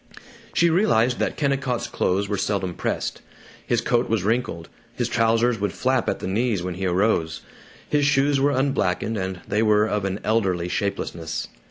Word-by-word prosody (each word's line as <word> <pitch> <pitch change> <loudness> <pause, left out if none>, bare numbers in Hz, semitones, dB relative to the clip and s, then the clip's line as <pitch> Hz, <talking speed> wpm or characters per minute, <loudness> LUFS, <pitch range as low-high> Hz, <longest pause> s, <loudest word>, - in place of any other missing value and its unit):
She 170 0 +4
realized 130 - +3
that - - -1
Kennicott's 135 -4 0
clothes 100 -3 0
were 100 - -1
seldom 100 -3 -1
pressed. - - -3 0.5
His 120 -2 +2
coat 120 -1 +1
was 110 -4 +1
wrinkled; 105 -6 -1 0.3
his - - -1
trousers 115 0 +2
would 100 -2 -1
flap 130 -1 +1
at - - -1
the - - -5
knees 105 -1 0
when 90 0 -3
he 95 +2 -2
arose. 90 -3 +1 0.5
His 150 -1 +1
shoes 140 0 +3
were 140 +1 +3
unblacked, 130 -9 +1
and 95 -4 -3
they 105 +2 +1
were 105 -1 +4
of 105 -2 -1
an 95 +1 -2
elderly 95 -6 +1
shapelessness. 85 -5 -3
110 Hz, 170 wpm, -23 LUFS, 95-125 Hz, 0.5 s, She